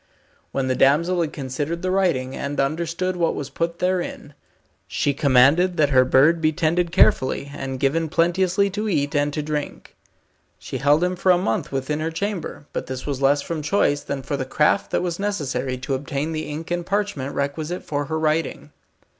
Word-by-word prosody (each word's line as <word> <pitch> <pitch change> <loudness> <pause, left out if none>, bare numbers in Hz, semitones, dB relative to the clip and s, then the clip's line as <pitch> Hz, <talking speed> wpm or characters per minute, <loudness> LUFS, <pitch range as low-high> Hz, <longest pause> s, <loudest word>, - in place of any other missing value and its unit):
When 135 -1 -1
the 130 - +1
damsel 170 +7 +3
had 160 - -1
considered 145 +5 -4
the 185 - 0
writing, 170 -10 +1
and 140 +1 -4
understood 170 +6 -1
what 170 -2 0
was 140 -1 -5
put 170 +3 -2
therein, 180 0 -2 0.5
she 145 - 0
commanded 140 +7 +4
that 145 -2 +3
her 130 -1 +6
bird 135 +6 +4
should - - -10
be 155 -1 +3
tended 170 +3 +1
carefully, 140 -5 +2
and 135 -1 -5
given 160 +4 +1
plenteously 180 +4 +2
to 210 +2 -2
eat 145 -5 0
and 145 0 +2
to 150 +1 -3
drink. 150 -1 -5 0.6
She - - -6
held 145 +4 +3
him 180 0 0
for 185 +1 +3
a 180 - +5
month 115 -11 -1
within 135 +3 -2
her 160 +1 -1
chamber, 180 -3 -4
but - - -4
this 130 -1 -5
was 140 -2 -3
less 140 +1 +3
from 165 -2 -4
choice, 145 -3 +1
than 135 -1 -5
for 140 - -2
the 135 - -2
craft 150 +8 +1
that - - 0
was 175 -1 -3
necessary 135 -10 -2
to 130 +2 -4
obtain 140 +3 -2
the 155 -1 -4
ink 155 +3 -6
and 175 0 -1
parchment 195 -8 -2
requisite 150 +5 -3
for 145 -1 -2
her 160 +3 -2
writing. 155 +1 -1
155 Hz, 195 wpm, -22 LUFS, 140-175 Hz, 0.6 s, her